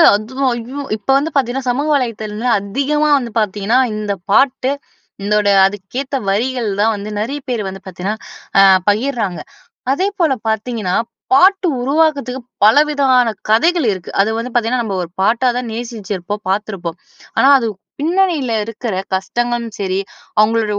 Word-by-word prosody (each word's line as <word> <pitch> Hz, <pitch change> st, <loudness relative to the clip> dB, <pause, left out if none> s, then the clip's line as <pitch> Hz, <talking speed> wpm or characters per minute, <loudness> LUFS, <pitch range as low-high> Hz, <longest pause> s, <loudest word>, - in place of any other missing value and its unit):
அதுவும் 260 Hz, +5 st, -1 dB
ஐயோ! 250 Hz, +5 st, -6 dB, 0.2 s
இப்ப 220 Hz, -, -19 dB
வந்து 310 Hz, +3 st, -1 dB
பார்த்தீங்கன்னா, 260 Hz, 0 st, 0 dB
சமூக 280 Hz, +5 st, 0 dB
வலைதளத்துல 225 Hz, -6 st, -1 dB
வந்து, 230 Hz, +4 st, -2 dB
அதிகமா 280 Hz, +9 st, 0 dB
வந்து 240 Hz, -4 st, -4 dB
பார்த்தீங்கன்னா, 210 Hz, +4 st, +1 dB, 0.2 s
இந்த 210 Hz, -1 st, -2 dB, 0.2 s
பாட்டு, 265 Hz, +2 st, +3 dB, 0.5 s
இதோட 210 Hz, 0 st, +2 dB, 0.2 s
அதுக்கேத்த 245 Hz, +8 st, -5 dB
வரிகள் 235 Hz, +2 st, 0 dB
தான் 225 Hz, +1 st, +3 dB
வந்து 205 Hz, +1 st, -6 dB
நெறைய 270 Hz, +7 st, -2 dB
பேர் 240 Hz, -4 st, -1 dB
வந்து 190 Hz, 0 st, -6 dB
பார்த்தீங்கன்னா 190 Hz, +4 st, -4 dB, 0.7 s
பகிர்றாங்க. 215 Hz, -, -1 dB, 0.5 s
அதேபோல 365 Hz, -2 st, +1 dB
பார்த்தீங்கன்னா 220 Hz, -3 st, -1 dB, 0.4 s
பாட்டு 375 Hz, +5 st, +5 dB
உருவாக்கத்துக்கு 280 Hz, -2 st, +1 dB, 0.2 s
பலவிதமான 270 Hz, 0 st, +4 dB, 0.2 s
கதைகள் 325 Hz, +7 st, +3 dB
இருக்கு. 185 Hz, -2 st, -8 dB
அது 210 Hz, -, +1 dB
வந்து 240 Hz, +2 st, -4 dB
பார்த்தீங்கன்னா, 240 Hz, +1 st, +1 dB
நம்ம 200 Hz, -3 st, -3 dB
ஒரு 170 Hz, -, -8 dB
பாட்டாதான் 240 Hz, +3 st, +1 dB
நேசிச்சுருப்போம், 210 Hz, -4 st, -5 dB
பார்த்துருப்போம். 190 Hz, -4 st, -3 dB, 0.4 s
ஆனா 270 Hz, -, +5 dB
அது 230 Hz, -, -1 dB, 0.3 s
பின்னணில 330 Hz, -7 st, +1 dB
இருக்கிற 230 Hz, -1 st, -4 dB, 0.2 s
கஷ்டங்களும் 235 Hz, +3 st, -2 dB
சரி, 190 Hz, -1 st, -1 dB, 0.4 s
அவங்களோட 225 Hz, +1 st, +3 dB
235 Hz, 130 wpm, -17 LUFS, 210-270 Hz, 0.7 s, பாட்டு